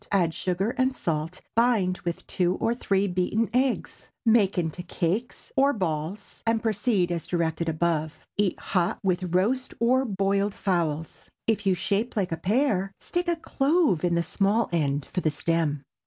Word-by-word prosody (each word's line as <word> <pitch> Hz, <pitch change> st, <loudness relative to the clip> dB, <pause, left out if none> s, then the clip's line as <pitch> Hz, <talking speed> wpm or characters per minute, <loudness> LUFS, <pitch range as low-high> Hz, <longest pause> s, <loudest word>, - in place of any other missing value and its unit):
Add 175 Hz, -5 st, +2 dB
sugar 185 Hz, +6 st, -1 dB
and 260 Hz, 0 st, +2 dB
salt, 165 Hz, -1 st, -2 dB
bind 220 Hz, -6 st, +2 dB
with 170 Hz, -1 st, -4 dB
two 180 Hz, 0 st, 0 dB
or 230 Hz, -, 0 dB
three 200 Hz, -4 st, +1 dB
beaten 185 Hz, +5 st, 0 dB
eggs; 255 Hz, 0 st, -1 dB, 0.2 s
make 215 Hz, -4 st, +4 dB
into 170 Hz, 0 st, -1 dB
cakes 180 Hz, +6 st, -2 dB
or 275 Hz, +1 st, +4 dB
balls, 175 Hz, -, -3 dB
and 225 Hz, -1 st, +2 dB
proceed 210 Hz, -4 st, +1 dB
as 170 Hz, -2 st, -3 dB
directed 165 Hz, -1 st, 0 dB
above. 160 Hz, -1 st, -1 dB
Eat 200 Hz, -3 st, +1 dB
hot 180 Hz, -3 st, 0 dB
with 180 Hz, -2 st, 0 dB
roast 250 Hz, +8 st, +1 dB
or 255 Hz, +3 st, +3 dB
boiled 200 Hz, -1 st, 0 dB
fowls. 165 Hz, -5 st, -2 dB, 0.2 s
If 220 Hz, -3 st, 0 dB
you 190 Hz, -, +4 dB
shape 205 Hz, +6 st, -1 dB
like 195 Hz, -5 st, 0 dB
a 165 Hz, -, -1 dB
pear, 195 Hz, -, +1 dB
stick 350 Hz, 0 st, -2 dB
a 345 Hz, -, +2 dB
clove 295 Hz, -, +1 dB
in 175 Hz, -1 st, +2 dB
the 170 Hz, -, +2 dB
small 205 Hz, +5 st, +1 dB
end 145 Hz, -4 st, 0 dB
for 180 Hz, -, -3 dB
the 155 Hz, -, +2 dB
stem. 150 Hz, -2 st, 0 dB
190 Hz, 165 wpm, -26 LUFS, 170-225 Hz, 0.2 s, make